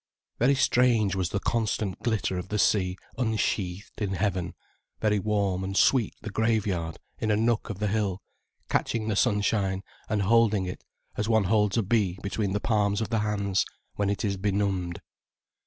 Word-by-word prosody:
Very 135 +4 +4
strange 120 -6 +3
was 95 -3 -1
the 100 - -1
constant 110 -3 -1
glitter 110 -5 0
of 90 - -7
the 105 - -1
sea 95 -1 +2 0.2
unsheathed 105 -4 -1
in 100 -2 -1
heaven, 95 -2 -1 0.4
very 105 -1 +2
warm 100 -3 0
and 95 +1 -3
sweet 125 -6 +3
the 110 - -5
graveyard, 100 -7 0 0.2
in 110 - -1
a 105 - +4
nook 115 +1 +1
of 105 - -4
the 105 - -2
hill 100 -2 0 0.5
catching 110 -1 0
the 105 - 0
sunshine 100 -1 +1 0.3
and 105 -1 +1
holding 110 -2 +3
it 90 - -6 0.3
as 105 +2 -1
one 110 -2 +4
holds 105 +1 +2
a 115 - +3
bee 100 -3 +1
between 100 0 -1
the 105 - +1
palms 105 -2 +1
of 110 0 -3
the 110 - +2
hands, 100 -2 +1 0.3
when 100 -1 0
it 100 +2 -1
is 100 -1 -1
benumbed. 95 -3 -1
105 Hz, 170 wpm, -27 LUFS, 95-110 Hz, 0.5 s, Very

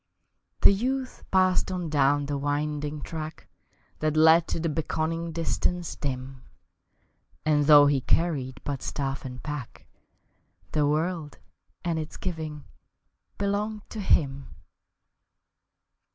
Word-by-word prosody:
The - - +8
youth 255 +5 -2
passed 185 0 +3
on 180 -2 -2
down 145 0 +3
the 145 0 -2
winding 145 0 -2
track 160 -1 -6 0.5
That 155 0 0
led 160 +1 +6
to - - -2
the 165 - -1
beckoning 165 +1 -2
distance 170 +1 -1
dim, 130 -2 -5 1.0
And 150 -2 +3
though 145 -1 +9
he 140 -2 +3
carried 135 -5 0
but 140 -2 -3
staff 135 -1 -3
and 125 -1 -7
pack, 145 -5 -6 0.9
The 150 -2 +2
world 155 0 -1 0.5
and 165 -2 0
its 155 0 -6
giving 155 -5 -5 0.7
belonged 205 +1 -2
to 220 - -5
him. 140 -8 +1
155 Hz, 115 wpm, -27 LUFS, 145-170 Hz, 1.0 s, though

